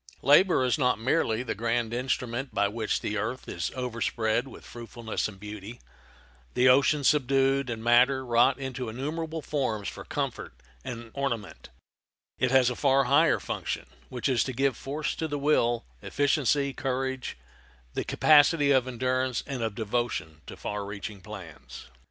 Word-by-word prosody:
Labor 150 +1 +5
is 130 +4 +1
not 125 -2 +2
merely 120 -1 +1
the 120 - -3
grand 115 +1 -1
instrument 125 +1 -2
by 100 - +3
which 110 +1 -2
the 105 - -2
earth 115 +5 -4
is - - -3
overspread 115 -1 -1
with - - -12
fruitfulness 115 -1 -4
and 100 -3 -11
beauty, 105 +2 -8 0.8
the 125 +1 +4
ocean 140 +3 +4
subdued, 135 -1 +2
and 115 -1 -4
matter 125 +3 +4
wrought 120 +2 +3
into 130 -3 -5
innumerable 155 +6 -4
forms 115 -9 -2
for - - -6
comfort - - -4 0.3
and 115 -1 -7
ornament; 120 - -4 0.7
it 130 - +2
has 130 -1 +4
a - - -4
far 135 0 +3
higher 135 +3 +4
function, - - -4 0.2
which 125 - -2
is 130 -4 +2
to 130 - -4
give 135 0 +1
force 145 +5 -3
to 160 - -3
the 145 -1 -3
will, 120 -5 +1 0.2
efficiency, 140 0 +1
courage, 130 - -3 0.6
the - - -2
capacity 145 -1 +5
of 130 -2 +3
endurance 130 0 -1
and 135 -4 -4
of 110 -2 -2
devotion 110 -8 -2
to - - -9
far 105 0 -4
reaching 100 0 -7
plans. - - -10
125 Hz, 155 wpm, -27 LUFS, 115-135 Hz, 0.8 s, Labor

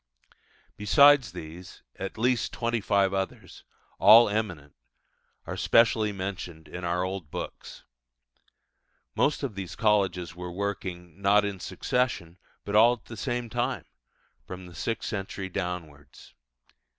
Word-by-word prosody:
Besides 135 +1 +6
these, 85 +1 -10
at 95 - -6
least 125 +2 +1
twenty 115 -1 -1
five 100 -1 +2
others, 95 -1 -4 0.4
all 115 0 +8
eminent, 90 -9 -3 0.7
are - - -5
specially 110 -2 +3
mentioned 95 -5 -6
in 90 - -8
our 85 +1 0
old 95 -4 -4
books. - - -7 1.3
Most 145 - +1
of 130 -6 -2
these 95 -2 -6
colleges 95 -6 +1
were 90 0 -6
working, 90 -2 -5
not 100 +1 +4
in 100 -2 -4
succession, 95 -7 -2 0.3
but 100 - -3
all 115 +3 +7
at 120 - -10
the 115 - -9
same 120 +2 -3
time, 120 +1 -2 0.6
from 90 0 -8
the 90 - -12
sixth 115 +6 -3
century 95 -2 -4
downwards. 85 -6 -6
100 Hz, 125 wpm, -27 LUFS, 90-110 Hz, 1.3 s, all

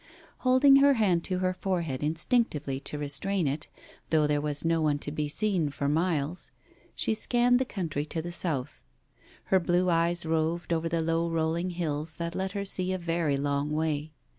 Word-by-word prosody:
Holding 265 +2 +6
her 280 0 +5
hand 185 -7 +2
to 185 - -1
her 185 - +1
forehead 170 -8 -2
instinctively 155 - 0
to 145 +2 -5
restrain 150 +6 -1
it, 145 +2 -2 0.4
though 155 -2 +3
there 150 0 +1
was 150 +1 -1
no 165 0 +2
one 150 -2 +2
to 145 - -4
be 150 0 -2
seen 180 -1 0
for 140 0 -3
miles, 160 +1 -1 0.5
she - - 0
scanned 245 +2 +3
the 260 - 0
country 165 - -3
to 160 - -3
the 175 +2 -5
south. 160 -6 -2 0.7
Her 190 - +6
blue 175 +1 +1
eyes 170 +1 +1
roved 165 +2 0
over 165 0 -1
the 165 0 0
low 165 +1 0
rolling 165 +2 -1
hills 160 -3 -3
that 170 +1 -4
let 190 +1 -3
her 200 -1 -3
see 185 -1 +1
a 185 - -1
very 165 -4 0
long 140 +1 -1
way. 155 0 -1
165 Hz, 185 wpm, -28 LUFS, 150-185 Hz, 0.7 s, Holding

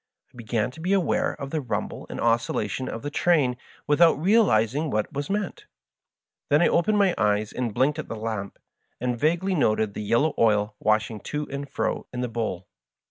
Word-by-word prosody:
I - - -22
began 115 0 -1
to 160 - -14
be 180 +4 0
aware 190 -4 +1
of 140 -2 -7
the 155 - -1
rumble 115 -6 -4
and - - -6
oscillation 115 +1 0
of 115 - -6
the 145 - -4
train 145 -7 +2 0.3
without 160 +1 +4
real 210 +6 +4
izing 115 +8 +1
what 105 +3 -1
was 145 0 -4
meant. 200 -1 -3 0.8
Then 145 +4 +4
I - - +5
opened 210 +5 +2
my 195 -3 +4
eyes 105 0 +1
and 125 -3 -2
blinked 135 +8 +1
at 155 - -5
the - - -4
lamp, 110 -3 -4 0.4
and 125 0 -1
vaguely 175 +6 +1
noted 110 - +1
the - - -5
yellow 120 +9 +2
oil 105 -2 +3
washing 110 0 +1
to 150 0 -3
and 140 0 -5
fro - - -2
in 125 - -4
the 125 - -1
bowl. 110 -6 -3
125 Hz, 190 wpm, -25 LUFS, 110-155 Hz, 0.8 s, I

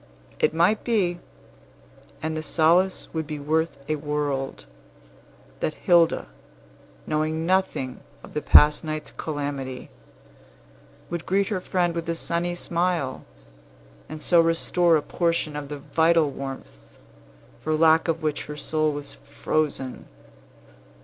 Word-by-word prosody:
It - - +3
might 175 +7 +2
be 185 -7 +1 1.0
and 160 0 -2
the 155 - -2
solace 170 +4 +2
would 160 -2 -3
be 150 -1 -4
worth 160 +2 0
a 155 0 0
world 145 -2 -3 0.9
that 155 - -2
Hilda, 170 - +3 0.8
knowing 155 +1 -1
nothing 180 -8 0 0.2
of - - -13
the 150 - -2
past 150 +1 +6
night's 155 -1 -4
calamity, 140 -4 -5 1.2
would 170 -1 -4
greet 195 +2 +1
her 195 -4 -2
friend 175 -2 0
with 170 0 -4
a 165 - 0
sunny 170 +1 -1
smile, 170 -6 -1 0.8
and 155 - -7
so 170 -2 +5
restore 165 0 +3
a 150 - -3
portion 165 -3 -1
of 145 -1 -5
the 145 - -5
vital 160 +1 +2
warmth, 135 - -7 0.8
for 155 0 -1
lack 160 +1 +4
of 165 0 -1
which 150 -1 -1
her 150 - -7
soul 155 +1 0
was 145 -1 -6
frozen. 145 -4 -3
160 Hz, 130 wpm, -25 LUFS, 150-170 Hz, 1.2 s, past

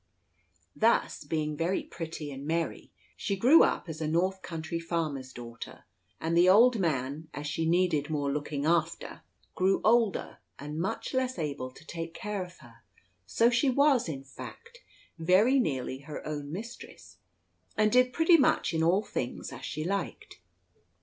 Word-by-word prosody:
Thus, 225 -7 +2
being 155 0 -2
very 170 +5 -1
pretty 160 -3 -6
and 135 0 -7
merry, 165 +1 -2 0.2
she 200 - -2
grew 255 +12 +6
up - - +2
as 160 -1 -6
a 155 - -1
North 185 +4 0
country 165 -1 -4
farmer's 155 -6 -3
daughter; 120 -2 -9 0.4
and 165 +1 -1
the 175 +2 +6
old 230 +4 +6
man, 150 -2 -1
as 145 +2 -5
she 160 +2 -1
needed 165 -4 +2
more 145 -2 -1
looking 145 0 -3
after, 165 0 0 0.3
grew 190 +1 +2
older 225 -2 +2 0.2
and 150 +3 -5
less 250 +5 -2
able 145 -5 -3
to 130 - -17
take 165 0 -6
care 210 -3 -3
of 180 0 -13
her; 115 -1 -17 0.5
so 230 - +3
she 245 +3 +3
was, 270 - +3
in 135 -3 -5
fact, 470 - -11 0.4
very 195 +11 +4
nearly 130 - -2
her 145 +2 -8
own 145 -1 -5
mistress, 170 - -9 0.6
and 215 0 +3
did 250 +1 +4
pretty 330 +4 +5
much 265 - +2
in 160 - 0
all 180 +6 +3
things 125 - -4
as 130 0 -10
she 155 - -4
liked. 195 - -4
165 Hz, 155 wpm, -29 LUFS, 150-210 Hz, 0.6 s, grew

